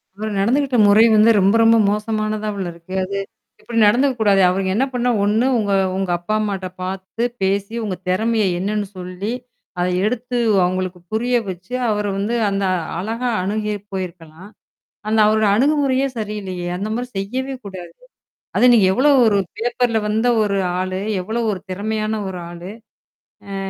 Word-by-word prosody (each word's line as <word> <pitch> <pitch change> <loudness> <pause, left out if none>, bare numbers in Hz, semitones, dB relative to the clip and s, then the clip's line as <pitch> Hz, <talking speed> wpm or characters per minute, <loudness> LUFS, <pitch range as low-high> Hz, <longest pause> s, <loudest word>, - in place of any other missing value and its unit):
இவரு 215 +1 -4
நடந்துகிட்ட 255 +4 +1
முறை 210 +2 +6
வந்து 215 +2 +6
ரொம்ப 195 +3 +3
ரொம்ப 225 0 +6
மோசமானதாவுல 215 -2 -2
இருக்கு. 170 +2 -12
அது 200 +1 -4 0.4
இப்படி 235 -1 -6
நடந்துக்கக்கூடாது. 220 -4 +3
அவருங்க 190 +1 -1
என்ன 260 +5 +2
பண்ணா 245 0 0
ஒண்ணு 215 +4 +2
உங்க 205 -2 -1 0.3
உங்க 190 -2 -2
அப்பா 195 +5 -3
அம்மாட்ட 195 -3 -3 0.2
பார்த்து 190 +5 -4 0.2
பேசி 200 +3 0
உங்க 195 -4 -2
திறமைய 220 +3 +1 0.2
என்னன்னு 205 +1 -2
சொல்லி 185 +4 -5 0.5
அத 180 - +1 0.2
எடுத்து 245 +2 -2 0.3
அவங்களுக்கு 185 0 -2
புரிய 240 +3 0
வச்சு, 185 +6 -8 0.2
அவர 210 -1 0
வந்து 205 +4 -2 0.2
அந்த 195 0 -1 0.4
அழகா 230 +6 -3 0.2
அணுகி 210 +2 -2 0.2
போயிருக்கலாம். 180 -1 -7 0.6
அந்த 220 0 +2
அவரோட 215 0 +2
அணுகுமுறையே 275 0 +2
சரியில்லையே! 200 -5 -4
அந்த 200 +3 -3
மாதிரி 245 +2 -3
செய்யவே 255 +8 -3
கூடாது. 180 -3 -8 0.6
அது 250 - +4
நீங்க 210 -5 +5
எவ்ளோ 275 +6 +3 0.2
ஒரு 210 -3 +3 0.2
பேப்பர்ல 240 0 0
வந்த 220 +3 +1 0.2
ஒரு 200 -1 0 0.2
ஆளு, 185 0 -2 0.2
எவ்வளோ 225 +5 -3
ஒரு 190 - -4
திறமையான 215 +2 -2
ஒரு 185 -1 -5
ஆளு? 175 +3 -8 0.8
அ - - -3
210 Hz, 145 wpm, -20 LUFS, 190-230 Hz, 0.8 s, முறை